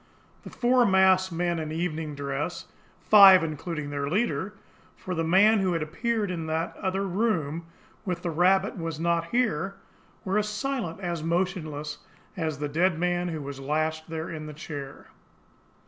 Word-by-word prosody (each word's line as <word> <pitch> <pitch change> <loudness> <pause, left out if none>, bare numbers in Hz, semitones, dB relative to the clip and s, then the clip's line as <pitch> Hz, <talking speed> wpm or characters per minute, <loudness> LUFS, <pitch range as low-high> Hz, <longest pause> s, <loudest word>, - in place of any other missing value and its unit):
The - - -10
four 250 0 +3
masked 190 -2 +4
men 170 0 -1
in 155 -1 -4
evening 160 -2 -3
dress, 140 +4 -4 0.4
five 195 -4 +9
including 155 -1 -4
their 140 -1 -2
leader, 205 +1 -1 0.4
for 185 - -5
the 165 -1 -1
man 200 +6 +5
who 190 -2 +1
had 165 -2 -1
appeared 210 +5 -2
in 165 -3 -4
that 160 +2 -2
other 190 +1 -1
room 170 -6 -1 0.4
with 180 -4 -3
the 175 - -1
rabbit 190 +5 +3
was 165 -2 -4
not 170 0 +1
here, 195 -4 0 0.5
were 195 +2 +1
as 210 0 -1
silent, 210 -5 -3
as 170 -3 -3
motionless, 165 -3 -2 0.4
as 160 -5 -2
the 145 +1 -3
dead 170 +4 +1
man 175 +1 0
who 160 -4 -4
was 140 -1 -7
lashed 155 +3 -2
there 160 0 -4
in 155 -2 -6
the 150 - -7
chair. 145 -2 -8
170 Hz, 165 wpm, -27 LUFS, 155-190 Hz, 0.5 s, five